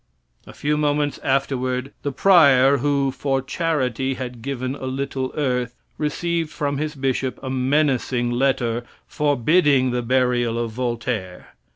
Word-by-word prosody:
A - - -11
few 150 +1 -1
moments 145 -1 0
afterward 130 -1 -1
the 145 - -2
prior 140 -6 +5
who 140 0 +1
"for 135 0 -1
charity 135 -3 -1
had 125 -2 -6
given 130 0 -3
a 135 -2 -6
little 135 0 -3
earth" 125 -4 -1 0.2
received 165 +2 -1
from 145 -2 -2
his 155 +1 -3
bishop 130 -1 -1
a 130 - -4
menacing 130 -2 +1
letter 120 -2 0 0.2
forbidding 145 -1 +2
the 125 0 -1
burial 120 -1 +1
of 115 -1 -2
Voltaire. 120 -6 -4
135 Hz, 135 wpm, -22 LUFS, 125-145 Hz, 0.2 s, prior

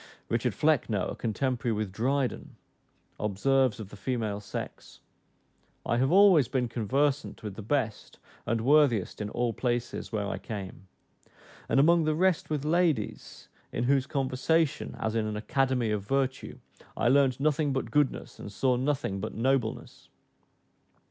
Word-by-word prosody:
Richard - - 0
Flecknoe, - - +1
a - - -6
contemporary 120 +1 -1
with 105 -2 -2
Dryden, 130 +5 -1 0.6
observes 120 +4 +1
of 105 -3 -7
the - - -11
female 110 -1 -2
sex, 105 - -8 0.9
"I 120 - +1
have 130 +4 +2
always 185 - +6
been 125 -1 0
conversant 130 +6 -1
with 105 -2 -5
the 110 - -8
best 110 -1 -2 0.3
and 115 0 0
worthiest 130 -7 +3
in 105 - -3
all 120 +1 -1
places 120 -1 -2
where 105 -2 -1
I - - -4
came; 95 -3 -7 0.8
and - - +3
among 165 +3 +5
the 155 0 +1
rest 185 0 +1
with 150 -2 -2
ladies, 160 -8 -1 0.2
in 120 - -2
whose 135 +1 +2
conversation, 140 +3 0
as 110 - -2
in 110 -1 0
an 105 0 -3
academy 130 0 0
of 105 -1 -1
virtue, 135 +4 -2 0.4
I - - +1
learnt 135 0 +3
nothing 150 0 +1
but 130 0 -2
goodness, 145 -3 0
and 100 - -8
saw 125 +4 +1
nothing 130 -7 -1
but 110 +3 -5
nobleness." 125 -1 -1
125 Hz, 150 wpm, -28 LUFS, 110-140 Hz, 0.9 s, always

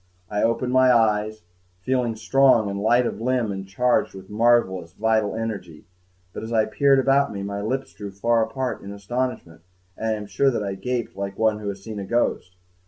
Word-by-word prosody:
I 105 - 0
opened 115 +2 0
my 130 0 +5
eyes, 110 -2 +1 0.4
feeling 125 -1 0
strong 110 -1 +3
and 100 - -4
light 120 +3 +3
of 110 - -4
limb 125 -3 0
and 95 -1 -6
charged 120 +2 +1
with 95 0 -11
a - - -13
marvelous 105 -6 +2
vital 110 0 +1
energy 105 -8 -5 0.5
but, - - -6
as 110 - -7
I 110 -2 +3
peered 135 +5 +3
about 135 +1 +3
me, 100 -1 -5
my 100 0 -4
lips 130 +6 -3
drew 100 -1 -7
far 115 +4 +1
apart 130 +3 -3
in 100 - -8
astonishment, 100 -5 -4 0.3
and 110 - -4
I 110 - +1
am 105 -1 -5
sure 135 +6 +2
that 115 -5 -2
I 100 -1 -3
gaped 120 +4 -3
like 100 0 -5
one 110 -1 +2
who 105 -1 -4
has 100 -1 -7
seen 110 -1 -6
a 100 - -5
ghost. 95 -5 -1
110 Hz, 205 wpm, -23 LUFS, 100-125 Hz, 0.5 s, my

